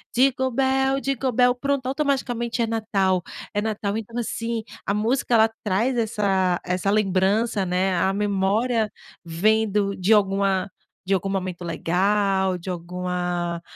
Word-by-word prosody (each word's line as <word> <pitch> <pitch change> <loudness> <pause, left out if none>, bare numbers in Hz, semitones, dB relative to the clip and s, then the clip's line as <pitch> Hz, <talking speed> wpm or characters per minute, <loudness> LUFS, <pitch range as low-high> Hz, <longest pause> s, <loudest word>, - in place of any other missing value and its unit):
dingo 260 +1 +3
bell, 265 +1 +1
dingo 270 -1 -1
bell. 245 +1 +4
Pronto, 275 +1 -2
automaticamente 255 -4 -1
é - - +2
Natal. 205 -5 0 0.3
É 205 - 0
Natal, 210 -1 -2
então 225 +1 -6
assim, 230 -1 -3 0.2
a 200 - +2
música 235 +3 +1
ela 220 0 +5
traz 220 +6 +1
essa 195 -5 +1
essa 180 +2 -1
lembrança 200 +1 +1
né, 185 +1 +1
a 190 +3 +2
memória 210 +3 +1 0.4
vem 215 +7 +2
do 200 0 0
de 190 +4 +2
alguma 195 -2 +2 0.3
de 195 - +1
algum 195 0 0
momento 185 -2 -3
legal, 190 +3 +1
de 180 +2 -8
alguma, 175 -1 -3
205 Hz, 140 wpm, -23 LUFS, 185-235 Hz, 0.4 s, ela